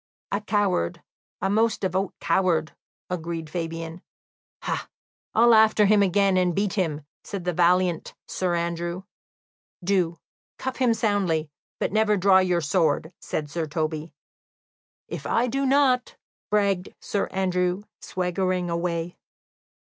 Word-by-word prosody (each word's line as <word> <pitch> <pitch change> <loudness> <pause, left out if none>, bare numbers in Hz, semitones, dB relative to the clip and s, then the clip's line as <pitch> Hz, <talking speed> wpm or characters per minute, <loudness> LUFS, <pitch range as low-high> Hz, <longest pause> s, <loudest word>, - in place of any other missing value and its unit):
"A 200 - 0
coward 205 - 0 0.4
a 195 - +1
most 220 +1 +2
devout 190 0 -1
coward," 170 -3 +1 0.4
agreed 165 -2 -4
Fabian. 165 0 -4 0.6
"Ha, - - -3 0.5
I'll 235 +1 +6
after 220 -1 +6
him 210 0 +5
again, 195 0 +3
and 180 -2 +2
beat 200 -1 0
him," 155 -7 -1 0.2
said 195 -3 -5
the 180 0 -1
valiant 175 0 +2
Sir 180 -2 -1
Andrew. 170 +1 -2 0.8
"Do, 175 -3 +1 0.4
cuff 260 0 -4
him 245 -3 +3
soundly, 190 -9 0 0.3
but - - 0
never 215 0 +3
draw 190 0 +6
your 180 -2 +2
sword," 160 0 +1
said 150 -2 -4
Sir 165 0 -2
Toby. 155 +1 -3 1.0
"If - - -6
I 235 - +2
do 275 +3 0
not 265 -2 +3 0.2
" - - -86
bragged 200 -3 +1
Sir 200 - -1
Andrew, 180 0 0 0.2
swaggering 180 -1 -1
away. 170 0 -2
180 Hz, 130 wpm, -25 LUFS, 170-205 Hz, 1.0 s, I'll